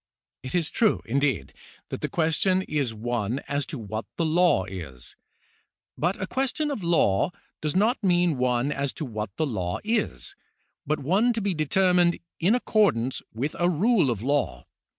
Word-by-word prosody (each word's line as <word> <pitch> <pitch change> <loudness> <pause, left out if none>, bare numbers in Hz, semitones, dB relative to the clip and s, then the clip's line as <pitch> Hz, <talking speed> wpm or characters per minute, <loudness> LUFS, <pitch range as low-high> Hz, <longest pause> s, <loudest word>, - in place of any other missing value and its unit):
It 130 - -5
is 170 -4 +1
true, 220 -4 +2
indeed, 135 - 0 0.4
that - - -5
the - - -2
question 170 +4 +1
is 145 -8 -1
one 115 +1 -2
as 140 0 -1
to 145 - -5
what 110 -1 -5
the 165 - +1
law 165 - +3
is, 80 -10 -8 0.8
but 175 +5 -1
a 190 - -1
question 270 +7 -1
of 220 -9 -4
law 160 - +3 0.3
does 155 +2 -2
not 220 +6 +2
mean 175 -5 +3
one 125 +2 +1
as 140 -1 -2
to 155 - -5
what 110 -4 -4
the 160 - 0
law 95 -9 -2
is, 210 - -1 0.5
but 155 +2 +1
one 195 - +2
to 225 - -2
be 200 -1 0
determined 175 +2 +3 0.2
in 190 +8 +4
accordance 200 - +2
with 135 +7 -3
a 175 0 +3
rule 185 - +3
of 115 -3 -2
law. 130 - 0
150 Hz, 170 wpm, -26 LUFS, 120-185 Hz, 0.8 s, in